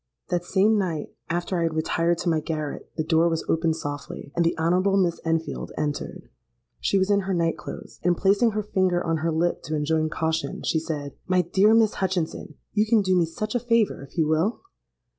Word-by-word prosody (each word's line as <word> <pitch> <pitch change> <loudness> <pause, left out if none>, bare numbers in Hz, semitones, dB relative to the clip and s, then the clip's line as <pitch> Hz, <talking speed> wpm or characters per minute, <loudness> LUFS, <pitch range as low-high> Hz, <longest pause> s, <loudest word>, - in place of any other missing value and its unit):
"That 175 -1 0
same 205 +4 +3
night, 170 -6 -3 0.2
after 175 +1 -1
I - - 0
had 165 -1 0
retired 165 +2 +1
to 175 - 0
my 160 -2 +2
garret, 155 -1 -4
the 155 - -1
door 165 +1 +3
was 165 -1 -2
opened 160 0 +1
softly, 145 -2 -6
and 170 - +3
the 165 - +1
Honourable 180 +4 +2
Miss 175 -3 +1
Enfield 165 0 -2
entered. 145 -1 -3 0.5
She 200 - +1
was 190 +1 +2
in 200 - +4
her 190 -1 -1
night 165 -1 +1
clothes; 155 - -9
and, 175 -1 +2
placing 205 +4 +3
her 215 0 -1
finger 185 -3 +1
on 165 -1 +1
her 165 +1 -1
lip 170 +2 0
to 155 - -2
enjoin 155 +1 +1
caution, 160 +1 -2
she 160 - +1
said, 150 -3 -5
'My 185 -1 +3
dear 195 +6 +4
Miss 220 -2 +4
Hutchinson, 175 -5 -2 0.2
you 215 +1 +2
can 220 -2 +4
do 185 -1 +2
me 175 -2 +4
such 215 +6 -4
a 245 - +1
favour, 230 -3 +1
if 140 - -13
you 160 - +3
will?' 160 - 0
170 Hz, 210 wpm, -25 LUFS, 160-195 Hz, 0.5 s, in